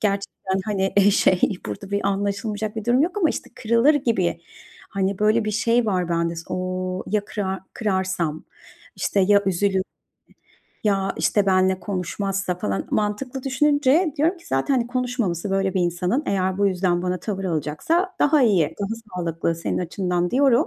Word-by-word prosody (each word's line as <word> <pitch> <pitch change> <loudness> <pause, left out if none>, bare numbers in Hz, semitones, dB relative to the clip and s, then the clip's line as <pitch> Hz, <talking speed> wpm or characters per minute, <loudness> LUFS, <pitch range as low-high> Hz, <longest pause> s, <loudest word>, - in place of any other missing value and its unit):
gerçekten, 195 -2 -1
hani, 195 -2 -1
eee, 200 0 +6
şey, 185 -2 +3 0.3
burada 105 - -6
bir 200 - 0
anlaşılmayacak 205 +2 -2
bir 220 - -4
durum 245 +4 +3
yok 365 +5 -1
ama, 330 -5 +3
işte, - - -6
kırılır 235 +4 +3
gibi, 195 -11 0 0.5
hani, 195 -1 -1
böyle 215 +2 +3
bir 215 - -1
şey 230 +2 +2
var 185 -4 0
bende 170 0 0
s, 165 - -5
ooo, 185 0 -3
"Ya 210 0 0
kırar 190 -2 -3
kırarsam, 190 -7 -1 0.5
işte, 200 - 0
ya 200 +1 +4
üzülürse 190 +1 +1 1.0
ya, 195 -2 +1
işte, 205 -2 +2
benle 185 0 +3
konuşmazsa?" 195 0 -2
falan. 100 - -2
Mantıklı 245 +5 -2
düşününce 290 +4 +2
diyorum 325 +6 +2
ki, 335 - -19
"Zaten, 135 - +1
hani, 240 -3 +1
konuşmaması 240 -8 -2
böyle 195 -1 0
bir 185 - +2
insanın 180 - 0
eğer 190 -1 0
bu 200 - +3
yüzden 180 -2 +1
bana 180 -1 -2
tavır 195 0 -4
alacaksa 185 - -1
daha 295 -1 +4
iyi, 175 -9 +3
daha 200 - -1 0.3
sağlıklı 165 -1 -1
senin 165 - -2
açından." 180 0 -1
diyorum. 275 - +4
195 Hz, 165 wpm, -23 LUFS, 185-230 Hz, 1.0 s, eee